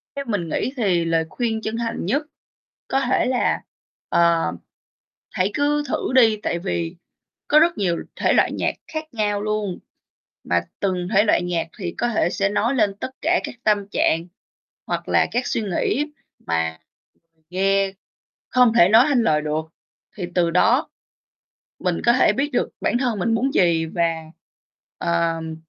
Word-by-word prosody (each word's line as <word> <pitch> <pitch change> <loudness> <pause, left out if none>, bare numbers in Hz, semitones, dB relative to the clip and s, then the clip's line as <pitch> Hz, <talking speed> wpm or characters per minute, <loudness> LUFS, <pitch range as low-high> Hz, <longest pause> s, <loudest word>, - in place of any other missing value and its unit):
Theo 280 - -4
mình 185 -7 -2
nghĩ 260 - -2
thì 180 -7 +1
lời 165 -1 +1
khuyên 225 -3 -2
chân 220 +1 -3
thành 230 -6 -3
nhất 280 - 0 0.7
có 270 - +1
thể - - +2
là, 255 -1 +1 0.5
ờ, 170 - +3 0.8
hãy 190 +3 0
cứ 295 +1 +1
thử 260 - -2
đi, 225 -4 +5
tại 170 - -1
vì 170 -2 -3 0.5
có 305 - +6
rất 340 +2 +3
nhiều 180 -4 0 0.2
thể - - +2
loại - - +3
nhạc - - -1
khác 310 -3 -6
nhau 205 -2 0
luôn, 210 -3 -2 0.7
mà - - +1 0.2
từng 185 -2 -1
thể 205 +2 +5
loại 195 - +3
nhạc 175 -2 -2
thì 175 -3 -4
có 240 - +1
thể 215 -6 +1
sẽ 195 0 0
nói 230 +6 0
lên 210 -5 +2
tất 230 - -6
cả 345 +3 +2
các - - -5
tâm 205 -2 +2
trạng 165 -3 +1 0.6
hoặc - - -3
là - - +3
các 245 +1 -1
suy 225 - -1
nghĩ 235 - 0 0.4
mà 80 -1 -1 0.7
nghe 195 +1 +1 0.6
không 250 -3 +4
thể 185 -6 +6
nói 230 +5 +7
thành 255 -4 +3
lời 150 -1 +2
được. 155 +1 -2 0.5
Thì 180 - -3
từ 170 -2 +2
đó, 240 - +3 0.9
mình 180 -2 -1
có 235 - +6
thể 255 - +4
biết 280 +2 -1
được 245 - 0
bản - - +1
thân 240 -6 -1
mình 225 +5 +1
muốn 265 +4 0
gì 165 -3 +3
và, 165 -1 -2 0.7
ờm, 165 -1 -1
200 Hz, 170 wpm, -22 LUFS, 170-240 Hz, 0.9 s, nói